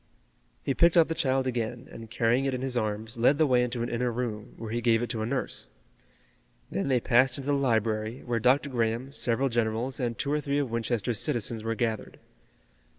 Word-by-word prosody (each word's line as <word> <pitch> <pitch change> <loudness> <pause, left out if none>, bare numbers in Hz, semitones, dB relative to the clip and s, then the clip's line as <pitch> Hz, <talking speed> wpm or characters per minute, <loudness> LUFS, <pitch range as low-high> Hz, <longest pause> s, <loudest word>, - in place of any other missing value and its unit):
He 135 - 0
picked 170 +4 +4
up 165 -1 +6
the - - +1
child 135 -4 +1
again, 120 0 -3
and 115 -1 -10
carrying 120 +3 +1
it 135 -1 0
in 125 - -4
his 130 -2 -1
arms, 110 0 -2
led 135 +5 +4
the 155 - +4
way 125 -3 +3
into 120 -1 -1
an 120 - -3
inner 120 +1 -1
room, 115 -2 -4
where 110 -2 -6
he 120 +1 -1
gave 115 0 +3
it 120 - -2
to 115 -3 -3
a 110 - -1
nurse. 135 +1 -2 1.0
Then 100 - -1
they 130 -2 +3
passed 120 +2 +3
into 140 +1 -2
the - - +3
library, 115 -3 0
where 120 -1 0
Dr. 130 +5 +3
Graham, 120 +2 -1
several 130 -1 0
generals 120 +2 -1
and 120 -3 -2
two 140 - -2
or 150 - +1
three 140 -1 -1
of 140 -5 -1
Winchester's 115 -1 -1
citizens 115 -1 -1
were 115 0 -1
gathered. 110 -1 -2
120 Hz, 215 wpm, -28 LUFS, 115-130 Hz, 1.0 s, up